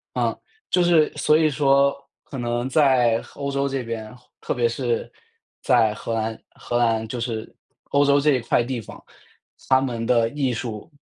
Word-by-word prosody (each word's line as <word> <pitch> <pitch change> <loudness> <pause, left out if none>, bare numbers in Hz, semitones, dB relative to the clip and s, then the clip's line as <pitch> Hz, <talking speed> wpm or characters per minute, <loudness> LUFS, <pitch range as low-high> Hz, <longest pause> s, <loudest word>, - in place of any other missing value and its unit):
嗯， - - 0 0.3
就 180 - +3
是， 165 -3 +4
所 150 - +3
以 155 -1 +3
说， 140 -1 +3 0.3
可 135 - -8
能 120 +1 -2
在 130 -5 +3
欧 140 -1 -4
洲 140 0 0
这 135 -1 -2
边， 115 -1 -6 0.3
特 - - -2
别 120 -1 +1
是 120 0 -2 0.5
在 115 -5 +3
荷 115 +2 -5
兰 110 0 -2
荷 120 - -4
兰， 115 -2 +1
就 125 - -5
是 115 -2 -4 0.4
欧 140 0 +4
洲 140 0 +4
这 150 +1 +3
一 130 - +2
块 120 - +1
地 120 -2 -4
方， - - -12 0.7
它 130 0 +5
们 120 -4 -3
的 115 -2 +3
艺 140 -3 -1
术， 115 +3 -6
125 Hz, 190 characters per minute, -23 LUFS, 115-140 Hz, 0.7 s, 它